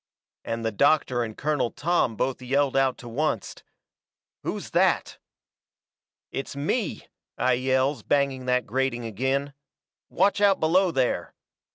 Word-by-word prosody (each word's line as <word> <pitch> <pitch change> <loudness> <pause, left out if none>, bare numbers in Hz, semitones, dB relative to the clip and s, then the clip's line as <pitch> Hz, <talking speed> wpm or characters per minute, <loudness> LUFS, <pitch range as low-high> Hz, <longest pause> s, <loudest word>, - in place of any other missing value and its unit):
And 115 0 -4
the 110 - +1
doctor 130 +1 +2
and 110 -2 -4
Colonel 150 -5 0
Tom 155 -7 0
both 130 +4 -2
yelled 140 +2 +1
out 135 -2 +2
to 120 - -11
oncet: 155 -9 -1 0.8
"Who's - - -5
that?" - - +1 1.1
"It's 135 0 -5
me," 160 - -2 0.3
I 130 - +2
yells, 130 +1 +1
banging 135 0 0
that 125 0 +2
grating 120 0 -1
agin. 130 +6 -1 0.6
"Watch 200 +1 +2
out 200 -2 +4
below 180 +4 +3
there!" 130 -6 -1
135 Hz, 130 wpm, -26 LUFS, 125-145 Hz, 1.1 s, out